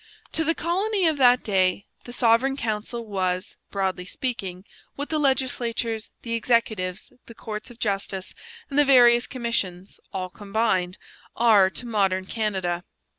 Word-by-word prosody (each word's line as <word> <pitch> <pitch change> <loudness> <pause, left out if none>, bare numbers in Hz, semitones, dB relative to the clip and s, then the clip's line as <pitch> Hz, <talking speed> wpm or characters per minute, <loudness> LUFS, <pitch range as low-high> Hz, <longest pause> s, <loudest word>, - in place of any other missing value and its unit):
To 320 - -1
the 325 +1 +1
colony 385 +4 0
of 315 -2 +2
that 250 -2 +5
day 190 -1 +1 0.2
the 245 - -8
Sovereign 245 +3 +3
Council 230 0 -3
was, 185 -3 -2
broadly 190 -2 -2
speaking, 190 -4 -4 0.3
what 285 +1 -5
the 310 - 0
legislatures, 240 -5 0
the 230 - -4
executives, 220 -5 0
the 230 - -12
courts 215 +1 -6
of 240 - -13
justice, 195 -3 -3 0.3
and 280 0 0
the - - +7
various 240 -3 +6
commissions 205 -7 -3
all 185 -1 -4
combined 200 -3 -1 0.4
are 215 -5 +5
to 245 - -7
modern 195 -5 +1
Canada. 190 -5 -2
225 Hz, 140 wpm, -25 LUFS, 190-245 Hz, 0.4 s, the